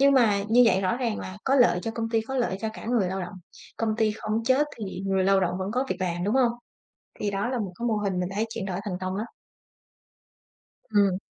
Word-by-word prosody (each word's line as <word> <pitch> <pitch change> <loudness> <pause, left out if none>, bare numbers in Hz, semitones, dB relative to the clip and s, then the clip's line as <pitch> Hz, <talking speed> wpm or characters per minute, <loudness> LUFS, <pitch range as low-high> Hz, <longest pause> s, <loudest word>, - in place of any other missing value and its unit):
nhưng 280 0 +6
mà 215 -6 +4
như 245 +2 +6
vậy 190 -2 +4
rõ 195 +5 +1
ràng 235 -4 -1
là 185 +2 -7
có 270 - +3
lợi 245 -9 +5
cho 225 - -2
công 225 0 -3
ty, 225 -1 +2
có 265 +4 -5
lợi 235 -6 0
cho 220 - -1
cả - - -9
người 230 -6 +2
lao 190 +1 -3
động, 180 +2 -6 0.4
công 220 -1 0
ty 220 -2 +3
không 215 +1 -2
chết 265 +4 +3
thì 215 - -4 0.2
người 190 -1 +2
lao 195 0 +4
động 180 -1 0
vẫn 190 +1 -2
có 255 +2 +1
việc 185 - 0
làm, 175 -1 -1
đúng 210 +5 +1
hông? 250 -3 +4 0.7
Thì 205 -1 -1
đó 200 +5 -1
là 255 -2 -1
một 195 -4 -3
cái 240 - -2
mô 220 - +1
hình 195 -3 -1
mình 180 0 -1
thấy 220 +2 +1
chuyển 225 -4 -4
đổi 185 -1 -3
thành 180 -3 -3
công 185 +1 -2
lắm. 215 - -2 1.6
Ừm. 200 -3 +3
215 Hz, 255 wpm, -26 LUFS, 190-235 Hz, 1.6 s, nhưng